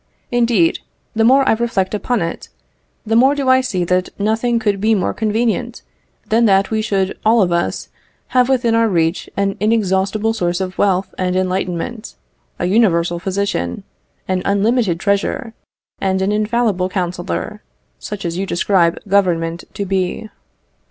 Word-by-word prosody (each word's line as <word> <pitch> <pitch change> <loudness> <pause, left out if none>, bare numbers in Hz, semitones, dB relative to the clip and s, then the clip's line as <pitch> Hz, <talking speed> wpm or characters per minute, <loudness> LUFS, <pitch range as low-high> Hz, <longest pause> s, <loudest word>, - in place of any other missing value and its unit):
Indeed, 230 -8 +2 0.3
the 225 - +1
more 265 +3 +5
I - - +5
reflect 220 -5 -1
upon 215 0 -1
it, 165 - -5 0.6
the 225 - 0
more 265 +5 +5
do 275 -2 -1
I 260 0 +5
see 190 -8 -2
that 180 +1 0
nothing 225 +3 +1
could 205 -3 0
be 220 +1 +3
more 190 - -1
convenient 230 +2 -1 0.5
than 230 +2 +3
that 195 -1 +3
we 220 0 +1
should 195 -3 -1
all 225 0 +4
of 175 - -1
us 170 0 -1 0.4
have 250 0 +3
within 245 -3 +2
our 230 0 +3
reach 170 -3 0
an 200 0 0
inexhaustible 210 0 +1
source 175 -5 -1
of 185 -1 -5
wealth 190 -1 +1
and 185 0 0
enlightenment 185 +4 -2 0.4
a - - -2
universal 175 -4 +2
physician, 190 - -2 0.4
an 185 -1 0
unlimited 200 -2 +1
treasure, 200 +3 -1 0.5
and 190 0 0
an 195 - +1
infallible 210 -3 0
counsellor, 175 - -3 0.4
such 200 -3 -6
as 170 +1 -3
you 195 - -2
describe 175 -1 +2
Government 175 -4 +1
to 200 - -3
be. 190 +3 -2
200 Hz, 150 wpm, -18 LUFS, 185-225 Hz, 0.6 s, more